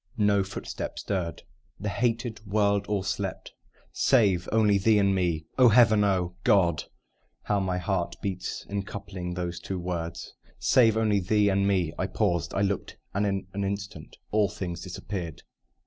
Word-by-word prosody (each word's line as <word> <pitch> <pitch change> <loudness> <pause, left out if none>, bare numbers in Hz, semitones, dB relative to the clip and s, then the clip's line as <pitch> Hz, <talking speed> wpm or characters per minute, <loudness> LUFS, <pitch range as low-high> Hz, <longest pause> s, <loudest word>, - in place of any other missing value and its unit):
No 105 -2 +3
footstep 100 +1 -6
stirred: 85 -6 -3 0.4
the 105 - -4
hated 115 0 -1
world 100 0 +2
all 105 -2 0
slept, 95 0 -3 0.4
Save 100 -9 +3
only 105 -3 +4
thee 110 +2 +4
and 100 -1 +3
me. 85 -4 0
(Oh, 125 -2 +8
Heaven! 110 -2 +6
oh, 90 -3 +1
God 95 -8 +3 0.6
How 105 -1 +1
my 95 -2 -1
heart 90 0 -1
beats 95 -2 -4
in 100 0 -2
coupling 95 -3 -6
those 90 -1 -3
two 95 +1 -4
words!) 85 -2 -4 0.2
Save 115 -4 +4
only 105 -2 +2
thee 105 +2 +2
and 100 0 +2
me. 90 -6 +1
I 95 - 0
paused 90 -5 0
I 95 - +1
looked 100 -1 -2 0.2
And 100 +1 +1
in 95 -1 -1
an 100 0 -2
instant 100 -5 -5
all 105 -2 +3
things 90 -2 -5
disappeared. 90 -2 -6
100 Hz, 160 wpm, -27 LUFS, 90-105 Hz, 0.6 s, Oh